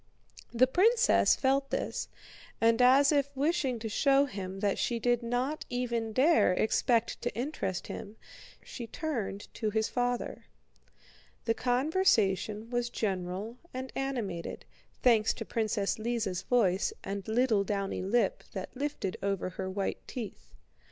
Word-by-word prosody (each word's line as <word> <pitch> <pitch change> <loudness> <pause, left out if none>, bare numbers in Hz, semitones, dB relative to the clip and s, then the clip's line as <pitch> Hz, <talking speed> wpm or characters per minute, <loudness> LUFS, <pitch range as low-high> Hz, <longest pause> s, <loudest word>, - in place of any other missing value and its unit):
The 245 +2 +5
princess 450 - +4
felt 275 +1 +1
this, - - -2 0.5
and 230 +1 +4
as 270 +3 +6
if 280 -2 +2
wishing 280 -4 +1
to 225 0 -5
show 275 +5 +3
him 195 -6 -6
that 200 -2 +1
she 240 - 0
did 240 +1 +1
not 245 +6 -1
even 235 -2 -2
dare 265 - +4
expect 230 +3 +1
to 245 - -1
interest 230 - -3
him, 205 +2 -7 0.5
she 235 - -7
turned 225 -10 -4
to 220 - -1
his 220 +1 0
father. 245 -1 -2 1.0
The 230 - +2
conversation 235 - +1
was 240 0 0
general 195 +2 -3 0.2
and 260 0 -5
animated, 235 -11 -3 0.4
thanks 225 -3 +4
to 225 - -6
Princess 215 -2 -1
Lise's 220 -5 -1
voice 210 - +2
and 195 -1 -5
little 220 -2 +2
downy 195 -1 -2
lip 240 - +1
that - - -6
lifted 275 -9 -3
over 195 -2 -1
her 185 +2 -4
white 195 +1 -2
teeth. 200 - -7
235 Hz, 135 wpm, -30 LUFS, 200-260 Hz, 1.0 s, as